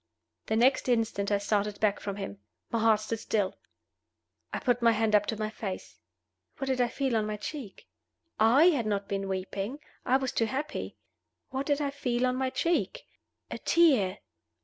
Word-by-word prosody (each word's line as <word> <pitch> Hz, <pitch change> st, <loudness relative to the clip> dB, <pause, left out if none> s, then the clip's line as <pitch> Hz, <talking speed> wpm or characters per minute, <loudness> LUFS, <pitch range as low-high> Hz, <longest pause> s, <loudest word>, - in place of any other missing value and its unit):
The 220 Hz, -, +1 dB
next 255 Hz, +3 st, +3 dB
instant 225 Hz, -4 st, +1 dB
I 205 Hz, -, +4 dB
started 205 Hz, 0 st, -1 dB
back 205 Hz, -2 st, +2 dB
from 200 Hz, -1 st, -4 dB
him. 100 Hz, -, -6 dB, 0.3 s
My 230 Hz, -, +1 dB
heart 220 Hz, -1 st, +4 dB
stood 220 Hz, +1 st, -3 dB
still. 205 Hz, -4 st, -1 dB, 1.0 s
I -, -, -2 dB
put 245 Hz, -1 st, +1 dB
my 230 Hz, -1 st, +5 dB
hand 220 Hz, 0 st, +1 dB
up 210 Hz, -, +4 dB
to 220 Hz, -, -2 dB
my 215 Hz, 0 st, -2 dB
face. 195 Hz, -4 st, -6 dB, 0.6 s
What 270 Hz, -, -3 dB
did 260 Hz, -1 st, +1 dB
I 245 Hz, -, +3 dB
feel 260 Hz, 0 st, -1 dB
on 215 Hz, -1 st, +1 dB
my 210 Hz, 0 st, -3 dB
cheek? 235 Hz, -1 st, -7 dB, 0.5 s
(I 255 Hz, +11 st, +6 dB
had 245 Hz, -9 st, -1 dB
not 200 Hz, -1 st, -1 dB
been 195 Hz, -1 st, -2 dB
weeping 195 Hz, +6 st, -3 dB, 0.3 s
I 260 Hz, -, +3 dB
was 265 Hz, -1 st, -2 dB
too 225 Hz, -, +1 dB
happy.) 285 Hz, +6 st, -4 dB, 0.5 s
What 270 Hz, +1 st, -3 dB
did 290 Hz, -1 st, +2 dB
I 285 Hz, -1 st, 0 dB
feel 250 Hz, -3 st, 0 dB
on 250 Hz, 0 st, +1 dB
my 260 Hz, 0 st, 0 dB
cheek? 285 Hz, +7 st, -1 dB, 0.5 s
A -, -, -4 dB
tear! 260 Hz, -, +3 dB
225 Hz, 185 wpm, -29 LUFS, 205-260 Hz, 1.0 s, I